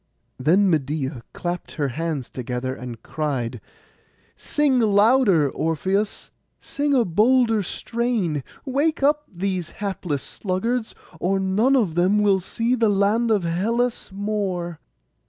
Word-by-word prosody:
Then 180 Hz, +9 st, +4 dB
Medeia 145 Hz, -5 st, -1 dB
clapped 175 Hz, 0 st, -5 dB
her 145 Hz, -3 st, -1 dB
hands 150 Hz, -1 st, -3 dB
together, 125 Hz, +1 st, -3 dB
and 125 Hz, -3 st, -8 dB
cried, 130 Hz, -7 st, -3 dB, 0.7 s
'Sing 285 Hz, -4 st, +1 dB
louder, 210 Hz, -, +4 dB
Orpheus, 190 Hz, +6 st, -1 dB, 0.3 s
sing 285 Hz, 0 st, -1 dB
a 245 Hz, -3 st, +3 dB
bolder 225 Hz, +4 st, +3 dB
strain; 205 Hz, -, -2 dB, 0.2 s
wake 285 Hz, +3 st, 0 dB
up 295 Hz, +1 st, +2 dB
these 185 Hz, -2 st, -2 dB
hapless 185 Hz, -8 st, -3 dB
sluggards, 220 Hz, +5 st, -2 dB, 0.2 s
or 195 Hz, +3 st, +1 dB
none 205 Hz, +8 st, +2 dB
of 210 Hz, -11 st, +2 dB
them 180 Hz, +5 st, +3 dB
will 205 Hz, -2 st, +3 dB
see 230 Hz, +6 st, -1 dB
the 230 Hz, -3 st, +3 dB
land 205 Hz, +4 st, +2 dB
of 210 Hz, -4 st, +2 dB
Hellas 225 Hz, +9 st, -1 dB
more. 190 Hz, -5 st, -3 dB
195 Hz, 120 wpm, -23 LUFS, 160-230 Hz, 0.7 s, Then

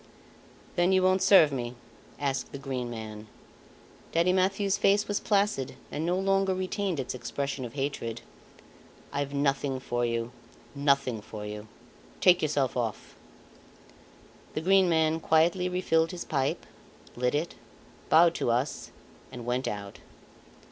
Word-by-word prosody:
"Then 175 Hz, +2 st, +3 dB
you 190 Hz, -1 st, +4 dB
won't 185 Hz, 0 st, +3 dB
serve 190 Hz, -6 st, +7 dB
me?" 125 Hz, -2 st, -4 dB, 0.4 s
asked 135 Hz, -3 st, -2 dB
the -, -, -6 dB
Green 130 Hz, -3 st, -4 dB
Man. 110 Hz, -2 st, -7 dB, 0.9 s
Daddy 170 Hz, +2 st, +3 dB
Mathieu's 195 Hz, +1 st, +2 dB
face 205 Hz, +1 st, +3 dB
was 205 Hz, 0 st, 0 dB
placid 200 Hz, -, 0 dB, 0.2 s
and 150 Hz, -, -3 dB
no 180 Hz, +1 st, +1 dB
longer 195 Hz, 0 st, +2 dB
retained 185 Hz, -2 st, -2 dB
its 130 Hz, -, -3 dB
expression 130 Hz, +2 st, -4 dB
of 120 Hz, -, -8 dB
hatred. 135 Hz, -5 st, -3 dB, 0.9 s
"I've 140 Hz, 0 st, -2 dB
nothing 140 Hz, -1 st, 0 dB
for 120 Hz, -1 st, -2 dB
you 115 Hz, 0 st, -1 dB, 0.4 s
nothing 140 Hz, -5 st, +1 dB
for 105 Hz, 0 st, -8 dB
you. 105 Hz, +1 st, -7 dB, 0.5 s
Take 180 Hz, -1 st, +5 dB
yourself 145 Hz, -5 st, 0 dB
off." 115 Hz, -4 st, -3 dB, 1.4 s
The 155 Hz, -, -1 dB
Green 190 Hz, +1 st, +4 dB
Man 160 Hz, -1 st, +2 dB
quietly 170 Hz, +3 st, +2 dB
refilled 165 Hz, -3 st, +1 dB
his 180 Hz, -2 st, -6 dB
pipe, 135 Hz, -3 st, -1 dB, 0.5 s
lit 125 Hz, +2 st, 0 dB
it, 160 Hz, +3 st, -1 dB, 0.6 s
bowed 165 Hz, +1 st, +6 dB
to -, -, +1 dB
us, 125 Hz, +5 st, -1 dB, 0.4 s
and 120 Hz, -2 st, -8 dB
went 125 Hz, +2 st, -1 dB
out. 100 Hz, -1 st, -5 dB
145 Hz, 135 wpm, -28 LUFS, 125-180 Hz, 1.4 s, serve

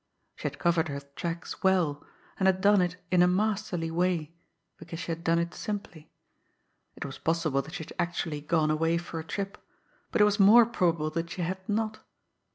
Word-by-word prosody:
She -, -, -3 dB
had -, -, -6 dB
covered 170 Hz, -1 st, +2 dB
her 140 Hz, -1 st, -4 dB
tracks 165 Hz, +5 st, -6 dB
well 175 Hz, -7 st, +2 dB, 0.4 s
and 190 Hz, -, +3 dB
had 190 Hz, -1 st, +3 dB
done 200 Hz, 0 st, +5 dB
it 175 Hz, -1 st, 0 dB, 0.2 s
in 180 Hz, -1 st, +5 dB
a 180 Hz, -, +6 dB
masterly 195 Hz, -3 st, 0 dB
way 170 Hz, -2 st, 0 dB, 0.4 s
because 165 Hz, 0 st, -8 dB
she 165 Hz, 0 st, -4 dB
had 165 Hz, +1 st, -5 dB
done 170 Hz, -1 st, +3 dB
it 170 Hz, 0 st, -1 dB
simply. 195 Hz, -7 st, -6 dB, 0.9 s
It -, -, -6 dB
was 135 Hz, -, -7 dB
possible 160 Hz, -4 st, +1 dB
that 155 Hz, +5 st, -10 dB
she 160 Hz, -, -4 dB
had -, -, -11 dB
actually 170 Hz, -3 st, -2 dB
gone 155 Hz, 0 st, +1 dB
away 165 Hz, +2 st, +2 dB
for 170 Hz, -1 st, -5 dB
a -, -, -5 dB
trip; 195 Hz, +4 st, -4 dB, 0.5 s
but -, -, 0 dB
it -, -, +8 dB
was 210 Hz, +1 st, +1 dB
more 220 Hz, +4 st, +8 dB
probable 170 Hz, -8 st, 0 dB
that 165 Hz, +1 st, -3 dB
she 175 Hz, +1 st, -4 dB
had 185 Hz, +3 st, -2 dB
not. 215 Hz, +1 st, -1 dB
170 Hz, 195 wpm, -28 LUFS, 160-190 Hz, 0.9 s, it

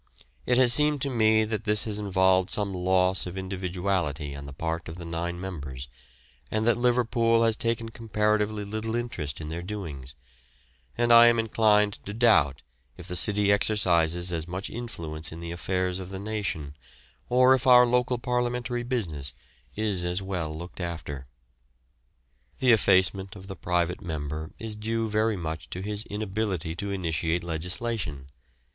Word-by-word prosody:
It 125 Hz, -, +3 dB
has 125 Hz, -2 st, +6 dB
seemed 150 Hz, 0 st, +3 dB
to 140 Hz, -, -1 dB
me 110 Hz, -2 st, +4 dB
that 110 Hz, 0 st, -3 dB
this 105 Hz, 0 st, +1 dB
has 105 Hz, -2 st, -3 dB
involved 95 Hz, -2 st, +2 dB
some 100 Hz, -2 st, -1 dB
loss 90 Hz, 0 st, +2 dB
of 90 Hz, +2 st, -7 dB
individuality 90 Hz, -6 st, -2 dB
on 70 Hz, 0 st, -8 dB
the -, -, -8 dB
part 80 Hz, +4 st, -4 dB
of 80 Hz, -, -7 dB
the 85 Hz, -1 st, -8 dB
nine 85 Hz, +1 st, -3 dB
members, 70 Hz, -8 st, -6 dB, 0.6 s
and 110 Hz, 0 st, 0 dB
that 120 Hz, -, +4 dB
Liverpool 120 Hz, -1 st, +2 dB
has 115 Hz, -1 st, +2 dB
taken 115 Hz, 0 st, -1 dB
comparatively 105 Hz, -1 st, 0 dB
little 110 Hz, +2 st, -3 dB
interest 90 Hz, -12 st, -4 dB
in 75 Hz, -1 st, -6 dB
their 85 Hz, +2 st, -4 dB
doings, 80 Hz, -10 st, -7 dB, 0.8 s
and 120 Hz, 0 st, +4 dB
I 115 Hz, 0 st, +9 dB
am 120 Hz, 0 st, +4 dB
inclined 105 Hz, -2 st, +2 dB
to 105 Hz, -, -5 dB
doubt 75 Hz, -, +3 dB, 0.3 s
if -, -, -10 dB
the 90 Hz, -, -4 dB
city 105 Hz, +2 st, +2 dB
exercises 90 Hz, -4 st, +2 dB
as 80 Hz, -1 st, -2 dB
much 90 Hz, +3 st, -5 dB
influence 85 Hz, -10 st, -5 dB
in 80 Hz, -, -8 dB
the 85 Hz, 0 st, -6 dB
affairs 90 Hz, +1 st, -2 dB
of 95 Hz, -1 st, -7 dB
the 95 Hz, -, -6 dB
nation, 100 Hz, -8 st, -4 dB, 0.5 s
or 125 Hz, +1 st, +6 dB
if 130 Hz, 0 st, 0 dB
our 125 Hz, -1 st, +8 dB
local 125 Hz, +1 st, +1 dB
parliamentary 125 Hz, 0 st, -1 dB
business 90 Hz, -, -3 dB, 0.4 s
is 105 Hz, -4 st, +1 dB
as 90 Hz, +1 st, 0 dB
well 90 Hz, -5 st, -3 dB
looked 85 Hz, +5 st, -8 dB
after. 80 Hz, -6 st, -5 dB, 1.3 s
The 130 Hz, -2 st, +4 dB
effacement 95 Hz, -2 st, +3 dB
of 95 Hz, -1 st, -11 dB
the 95 Hz, 0 st, -7 dB
private 90 Hz, 0 st, -1 dB
member 80 Hz, -1 st, -4 dB
is 110 Hz, 0 st, -4 dB
due 110 Hz, +1 st, -2 dB
very 110 Hz, 0 st, +1 dB
much 80 Hz, -2 st, -5 dB
to 90 Hz, -, -5 dB
his 105 Hz, +1 st, -3 dB
inability 100 Hz, -5 st, -3 dB
to 100 Hz, +2 st, -4 dB
initiate 85 Hz, -3 st, -1 dB
legislation. 85 Hz, -, -3 dB
95 Hz, 160 wpm, -27 LUFS, 85-110 Hz, 1.3 s, I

